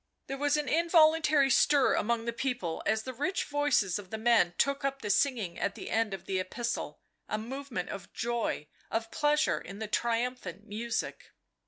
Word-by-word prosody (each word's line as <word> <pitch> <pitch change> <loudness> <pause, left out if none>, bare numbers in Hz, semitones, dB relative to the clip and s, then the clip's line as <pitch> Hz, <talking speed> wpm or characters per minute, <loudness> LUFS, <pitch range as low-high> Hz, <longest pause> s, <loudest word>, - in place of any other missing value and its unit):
There 275 - -5
was 290 +1 +2
an 300 - -2
involuntary 315 -3 +4
stir 285 -1 +4
among 230 +1 0
the 235 - -2
people 240 -10 -2
as 220 0 +1
the 260 - -6
rich 360 +10 -1
voices 285 -10 +1
of 190 -3 -11
the 220 - -4
men 220 -6 +3
took 280 0 +1
up 275 -1 -2
the 210 - 0
singing 220 -8 +1
at 200 - -1
the - - -7
end 225 -1 +1
of 190 -1 -6
the 190 -1 -1
epistle, 235 +6 -3 0.3
a 215 - 0
movement 240 -3 -5
of 195 - -7
joy, 235 -9 -2 0.2
of 225 0 -2
pleasure 300 +1 +2
in 195 - -9
the 220 0 -4
triumphant 230 -4 -2
music. 225 +2 -4
235 Hz, 180 wpm, -30 LUFS, 210-280 Hz, 0.3 s, involuntary